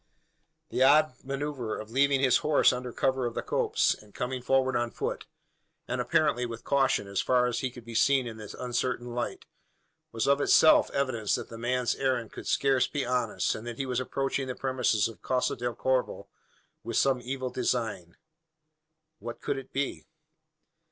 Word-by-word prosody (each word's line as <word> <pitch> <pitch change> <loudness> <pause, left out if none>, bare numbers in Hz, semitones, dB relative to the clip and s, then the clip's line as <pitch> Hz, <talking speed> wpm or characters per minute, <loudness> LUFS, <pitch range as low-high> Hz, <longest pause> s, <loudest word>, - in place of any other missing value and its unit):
The - - -2
odd 150 +2 +5
manoeuvre 135 -4 -3
of 110 +1 -9
leaving 135 +1 +3
his 130 -3 +5
horse 150 -2 +3
under 125 0 -5
cover 130 0 0
of 115 - -6
the - - -2
copse, - - +1
and 105 -1 -17
coming 125 +1 -3
forward 130 0 +2
on 120 0 0
foot, - - -4 0.6
and - - -1
apparently 125 - +2
with 115 -1 -5
caution, 135 -7 +1
as 100 -1 -1
far 125 -1 +3
as 120 -1 -1
could 125 -2 -5
be 115 - -8
seen 135 +3 +3
in 115 -2 -7
the 105 -2 -9
uncertain 125 -1 -2
light, 120 0 -4 0.7
was 115 - -1
of 140 +1 +3
itself 155 - +6
evidence 125 -7 0
that - - -6
the 115 - -8
man's 125 +1 0
errand 125 -4 -1
could - - -9
scarce 135 -2 +2
be 145 -2 -2
honest 125 -3 0
and 110 - -7
that 120 -1 -6
he 135 - -2
was 125 -1 -1
approaching 135 +1 -2
the 130 - -4
premises 125 -5 +1
of 115 - -11
Casa 130 -1 0
del 120 -1 -3
Corvo 130 0 -1 0.5
with 115 +1 -3
some 135 -2 +2
evil 130 0 -4
design. 115 -8 -2 1.0
What 120 0 -7
could 135 - -2
it 135 - -13
be? 140 0 -3
125 Hz, 180 wpm, -28 LUFS, 120-135 Hz, 1.0 s, itself